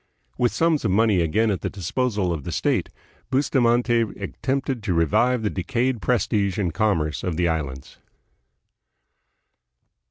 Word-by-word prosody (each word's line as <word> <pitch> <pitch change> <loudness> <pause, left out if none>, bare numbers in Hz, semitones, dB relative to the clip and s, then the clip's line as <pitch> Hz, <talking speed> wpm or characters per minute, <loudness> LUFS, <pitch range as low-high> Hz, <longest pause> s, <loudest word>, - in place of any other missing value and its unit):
With 120 - +1
sums 165 -2 +1
of 110 - +1
money 100 -1 +3
again 105 +7 +1
at 95 - -2
the - - -2
disposal 100 -1 -1
of 75 -4 -5
the - - -5
state, - - 0 0.4
Bustamante 120 -3 +2 0.2
attempted 130 +5 -2
to 95 -4 -1
revive 110 - +2
the 105 - 0
decayed 120 +5 -1
prestige 105 -4 0
and 90 -6 -1
commerce 80 -6 0
of 90 -3 -2
the 90 0 +2
Islands. 70 -5 -4
105 Hz, 135 wpm, -23 LUFS, 90-120 Hz, 0.4 s, money